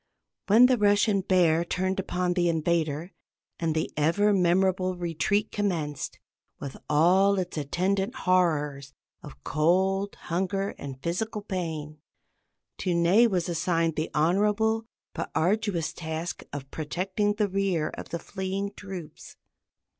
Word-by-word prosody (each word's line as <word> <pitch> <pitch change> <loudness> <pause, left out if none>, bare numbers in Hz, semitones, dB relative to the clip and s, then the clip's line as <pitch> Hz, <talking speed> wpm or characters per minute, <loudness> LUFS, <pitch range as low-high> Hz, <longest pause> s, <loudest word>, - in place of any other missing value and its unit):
When 225 +5 +7
the 250 -2 +3
Russian 205 0 +3
Bear 175 -3 +3
turned 185 +2 -1
upon 180 -1 -1
the 175 -1 +2
invader, 165 0 0 0.5
and 160 -2 0
the 155 - -1
ever 185 +8 +3
memorable 185 0 +2
retreat 175 +5 0
commenced, 165 -9 -2 0.4
with 140 -1 -6
all 185 +6 +4
its 180 -1 -3
attendant 185 +7 -1
horrors 150 -7 +1 0.3
of 65 0 -12
cold, 190 +5 +1
hunger, 190 +3 -2
and 135 -2 -7
physical 210 +5 -2
pain, 160 -6 -4 0.8
to 180 -2 0
Ney 180 +8 +5
was 180 -6 -1
assigned 165 -1 0
the 155 - -2
honorable 210 +7 +2 0.3
but - - -4
arduous 190 -2 0
task 160 +1 -5
of 140 -2 -7
protecting 190 +6 -1
the 210 -1 +1
rear 190 -5 0
of - - -9
the 170 - -3
fleeing 195 +3 -4
troops. 185 -6 -9
180 Hz, 125 wpm, -27 LUFS, 160-195 Hz, 0.8 s, When